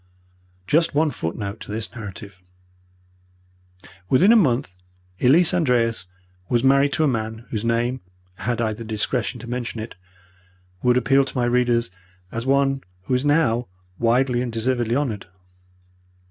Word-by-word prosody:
Just 160 - +2
one 155 0 +3
footnote 100 +4 -4
to - - -9
this 110 +1 -4
narrative. 100 -4 -9 1.7
Within 185 - +5
a - - +7
month 130 - +2 0.4
Elise 160 +8 +5
Andreas 120 - +1 0.4
was 120 0 +1
married 140 +1 +4
to 155 - +1
a - - +3
man 110 -2 -3
whose 110 -2 -2
name, 120 +2 0 0.4
had 120 +3 -2
I 110 -2 0
the 110 - -10
indiscretion 115 +2 -2
to 120 - -9
mention 120 -1 -4
it, 110 +1 -6 0.9
would 125 0 +3
appeal 135 +3 +3
to 135 0 -7
my 120 - +2
readers 120 -4 +1 0.4
as 115 +3 -4
one 135 0 +2 0.2
who 115 - -3
is 125 +1 +1
now 125 -6 +2 0.3
widely 120 +1 +2
and 125 -1 -3
deservedly 120 0 0
honoured. 120 -9 -2
120 Hz, 145 wpm, -22 LUFS, 115-135 Hz, 1.7 s, a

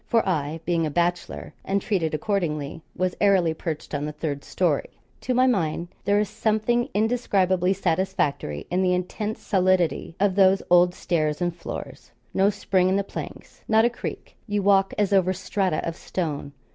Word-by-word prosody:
For 230 -3 +2
I 160 -3 -1
being 170 -1 +1
a - - -2
bachelor, 175 +3 -2
and 195 +1 0
treated 175 -6 -1
accordingly, 155 -4 -2
was 185 0 0
airily 190 -5 +4
perched 160 -1 -5
on 145 0 -1
the 150 - -3
third 150 -2 -4
storey. - - 0 0.3
To 255 - -1
my 255 +1 +5
mind, 175 -8 0 0.2
there 205 +1 +3
is 210 - +1
something 220 +4 0
indescribably 195 -5 +2
satisfactory 175 - -1
in 180 +1 +1
the 180 -1 +3
intense 210 +4 -4
solidity 185 -3 +1
of 200 -1 +3
those 195 0 +4
old 175 0 +5
stairs 155 -3 -1
and 175 -1 -1
floors 170 - -8 0.2
no 195 +1 +4
spring 190 -2 +1
in 190 - +2
the 200 - +1
planks, - - -9
not 220 +1 +4
a 240 - +2
creak; - - -7
you 205 -1 -1
walk 195 -1 +4
as 205 -1 +1
over 185 -1 +3
strata 185 -2 -1
of 165 - -3
stone. 150 -7 -4
185 Hz, 170 wpm, -24 LUFS, 165-200 Hz, 0.3 s, my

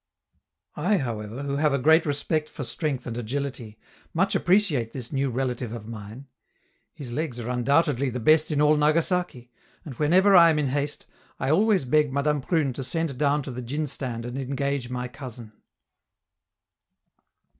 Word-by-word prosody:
I, 185 +7 +2
however, 115 - -4
who 140 0 -2
have 150 -1 +2
a - - +2
great 160 +5 +4
respect 150 +2 -1
for 145 - -6
strength 145 0 -3
and 120 - -5
agility, 120 -2 -4 0.4
much 190 +4 +2
appreciate 175 - +2
this 125 -3 -7
new 135 -1 0
relative 125 -2 -3
of 110 -2 -8
mine. 110 +3 -9 0.7
His 140 -7 -8
legs 140 -2 -3
are 120 +1 -4
undoubtedly 140 +2 +2
the 125 0 -4
best 155 +6 +4
in 150 -1 +1
all 150 +1 +5
Nagasaki, 155 -4 0 0.3
and 145 - -7
whenever 185 +6 +5
I 170 -2 +8
am 160 - +2
in 145 -3 0
haste, 145 +2 -3 0.3
I 135 - 0
always 195 -1 +3
beg 150 +2 +2
Madame 140 +1 0
Prune 145 -2 0
to 135 - -5
send 160 +2 -2
down 145 0 +2
to 135 - -6
the 125 +1 -6
djin 145 +6 -3
stand 125 -4 -5
and 125 +2 -5
engage 140 -1 -2
my 125 0 -3
cousin. 120 -2 -9
140 Hz, 165 wpm, -25 LUFS, 125-155 Hz, 0.7 s, I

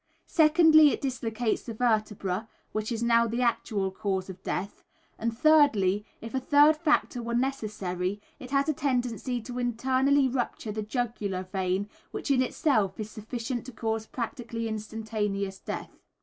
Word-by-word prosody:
Secondly, 310 -1 +6
it - - -1
dislocates 240 -4 -1
the 230 - -7
vertebra, 215 -3 0 0.2
which 215 +2 -3
is 230 0 -2
now 235 0 +4
the 235 +2 -1
actual 210 -5 0
cause 190 -1 -2
of 185 - -13
death. 200 +2 -4 0.4
And 230 0 -2
thirdly, 230 - +4 0.2
if 230 - -8
a 265 - +1
third 290 +3 +5
factor 300 -5 +1
were 235 0 -3
necessary, 205 -7 -2 0.2
it 255 - -9
has 275 +1 +2
a 310 - +2
tendency 250 -2 -1
to 250 +1 -5
internally 260 +3 +2
rupture 245 -3 -2
the 215 +1 -3
jugular 215 -4 -2
vein, 185 +1 -1 0.2
which - - -3
in 260 -2 +4
itself 220 - +1
is 215 0 -5
sufficient 235 +3 -4
to - - -6
cause 220 -1 -3
practically 235 -2 -4
instantaneous 210 -2 -3
death. - - -6
230 Hz, 150 wpm, -28 LUFS, 210-260 Hz, 0.4 s, Secondly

